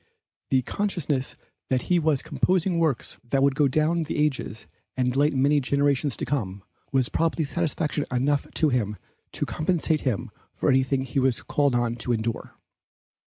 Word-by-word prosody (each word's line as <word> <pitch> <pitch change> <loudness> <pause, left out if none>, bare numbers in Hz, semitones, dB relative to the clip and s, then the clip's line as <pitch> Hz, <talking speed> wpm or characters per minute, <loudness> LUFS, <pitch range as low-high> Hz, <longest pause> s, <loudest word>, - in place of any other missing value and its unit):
The 130 -1 +2
consciousness 160 - -2 0.3
that 130 -2 +1
he 180 -1 +2
was 155 -4 +1
composing 180 -1 +1
works 155 -7 0
that 135 +3 +1
would 140 0 +4
go 145 0 +3
down 155 +5 +1
the 160 -1 -3
ages 150 -7 -1 0.3
and 125 -1 +1
delight 145 +3 +2
many 140 +3 +3
generations 140 0 +1
to - - -3
come, 100 -8 -3 0.3
was 130 -2 +2
probably 165 -1 0
satisfaction 150 -1 -1
enough 140 +3 +1
to 155 - +3
him 105 -6 -1 0.4
to - - -1
compensate 160 -1 0
him 125 -2 -2 0.2
for - - 0
anything 130 0 +2
he 135 +1 -1
was 130 -2 +1
called 140 -3 +1
on 120 -1 0
to 120 +1 -1
endure. 115 0 -3
140 Hz, 160 wpm, -25 LUFS, 125-155 Hz, 0.4 s, would